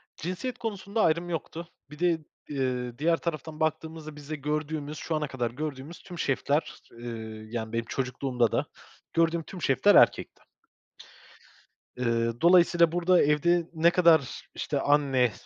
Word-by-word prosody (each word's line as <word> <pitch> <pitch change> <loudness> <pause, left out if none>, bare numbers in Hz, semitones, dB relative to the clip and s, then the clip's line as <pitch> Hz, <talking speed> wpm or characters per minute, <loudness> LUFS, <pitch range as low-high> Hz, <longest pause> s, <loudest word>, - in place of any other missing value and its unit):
Cinsiyet 185 +9 -4
konusunda 215 -1 -3
ayrım 170 0 +2
yoktu. 165 0 -5 0.2
Bir 150 +1 -12
de, 175 -2 +2 0.3
ııı, 125 -3 -2
diğer 165 +3 +2
taraftan 160 -2 -5
baktığımızda 160 -1 -3
bizde 150 +1 -6
gördüğümüz, 150 +1 -3
şu 160 - -3
ana 150 -1 -1
kadar 125 -4 -3
gördüğümüz 145 +3 -6
tüm 175 -3 -9
şefler, 140 +2 0 0.2
ııı, 110 -2 -7
yani, 110 -1 -4
benim 115 0 -1
çocukluğumda 130 -2 -1
da - - 0 0.5
gördüğüm 165 0 +2
tüm 180 +1 -10
şefler 135 -5 +4
erkekti. - - +4 1.5
Iıı, 115 -1 -1
dolayısıyla 170 -1 +5
burada 175 +1 +3
evde 165 +4 +2
ne 165 +1 +4
kadar 165 -7 +3
işte - - -2
anne, 135 -5 +3
150 Hz, 135 wpm, -27 LUFS, 130-170 Hz, 1.5 s, dolayısıyla